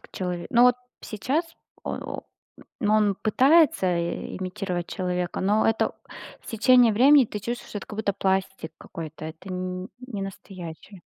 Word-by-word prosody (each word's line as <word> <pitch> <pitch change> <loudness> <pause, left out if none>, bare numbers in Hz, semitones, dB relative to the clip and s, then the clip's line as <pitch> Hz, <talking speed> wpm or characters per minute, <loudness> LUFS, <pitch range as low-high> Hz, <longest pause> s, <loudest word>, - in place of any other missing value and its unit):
к - - -18
человеку 180 -2 -4
ну, 240 - +7
вот 250 0 +6 0.2
сейчас 260 - -1 0.4
о - - -3 0.2
о - - -8 0.6
ну, 210 0 +2
он 210 -2 +3
пытается 250 - +4
и 170 0 -3
имитировать 185 -1 -3
человека, 180 -1 -2
но 205 +3 +2
это 225 - +1 0.5
с - - -18
течением 230 +1 +5
времени 270 +4 +7
ты 210 -1 -6
чувствуешь, 240 +4 -5
что 205 - -4
это - - -10
как 210 - -7
будто 205 -2 0
пластик 190 -3 -1
какой-то, 155 -1 -8
это 160 +4 -9
н 185 +1 -4 0.2
ненастоящее. 195 -4 -8
195 Hz, 155 wpm, -25 LUFS, 180-225 Hz, 0.6 s, ну